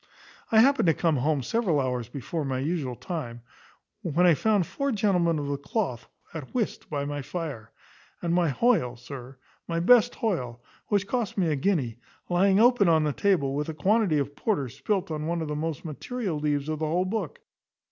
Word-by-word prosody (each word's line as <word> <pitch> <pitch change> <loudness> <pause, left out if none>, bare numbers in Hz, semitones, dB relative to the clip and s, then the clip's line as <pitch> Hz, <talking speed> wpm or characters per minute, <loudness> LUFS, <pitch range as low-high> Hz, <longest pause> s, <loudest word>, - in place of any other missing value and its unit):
I 220 -1 +7
happened 275 -5 +4
to 165 - +4
come 165 -4 +1
home 140 +1 0
several 190 - +1
hours 125 -3 -2
before 145 +5 -4
my 135 -2 -2
usual 140 -2 -2
time, 120 -8 -6 0.6
when 170 +2 +2
I 175 - +7
found 205 +3 +2
four 280 - -2
gentlemen 185 -7 +2
of 145 - -3
the 140 0 -2
cloth 140 - -3 0.3
at 160 - -8
whist 230 -4 -2
by 145 -2 -2
my 145 0 -3
fire; 140 -7 -6 0.5
and 170 -1 -1
my 175 -2 +3
Hoyle, 140 - +2
sir 130 +1 -10 0.3
my 165 -1 -1
best 240 +6 +5
Hoyle, 125 - -2 0.3
which 205 -2 +1
cost 230 -1 -2
me 180 -4 +2
a - - +1
guinea, 135 - 0 0.3
lying 190 +3 +4
open 235 -5 +5
on 160 -1 +4
the 150 -1 0
table, 170 -9 +1
with 150 +2 -2
a 160 - -4
quantity 195 +1 +2
of 145 0 -2
porter 160 - -1
spilt 190 - -2
on 155 0 -3
one 170 0 -1
of 160 - -3
the 150 - -3
most 160 +1 -3
material 180 - -4
leaves 145 -1 -1
of 155 -1 -2
the 155 - -1
whole 175 +4 +1
book. 195 -4 -3
160 Hz, 195 wpm, -27 LUFS, 140-195 Hz, 0.6 s, I